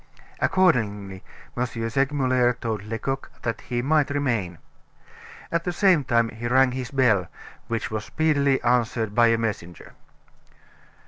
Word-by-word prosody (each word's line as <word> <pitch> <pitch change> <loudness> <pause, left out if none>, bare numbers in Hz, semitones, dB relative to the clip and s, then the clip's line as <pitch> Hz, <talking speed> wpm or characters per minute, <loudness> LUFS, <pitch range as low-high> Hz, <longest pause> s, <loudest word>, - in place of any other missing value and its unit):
Accordingly, 105 - +1 0.3
M. 125 - 0
Segmuller 130 +2 +1
told 115 -3 -4
Lecoq 115 +6 -4
that 115 -2 -3
he 120 -1 -3
might 150 +1 +2
remain. 120 - -1 0.9
At 170 0 0
the 180 - -2
same 180 -4 +3
time 115 -2 +2
he 115 +2 -6
rang 130 +1 +4
his 125 -1 -5
bell; 115 -10 +2 0.4
which 115 -1 -3
was 110 -1 -3
speedily 140 -4 +1
answered 120 -3 +1
by 120 +1 +5
a 115 0 +3
messenger. 100 -7 -5
120 Hz, 130 wpm, -24 LUFS, 110-135 Hz, 0.9 s, by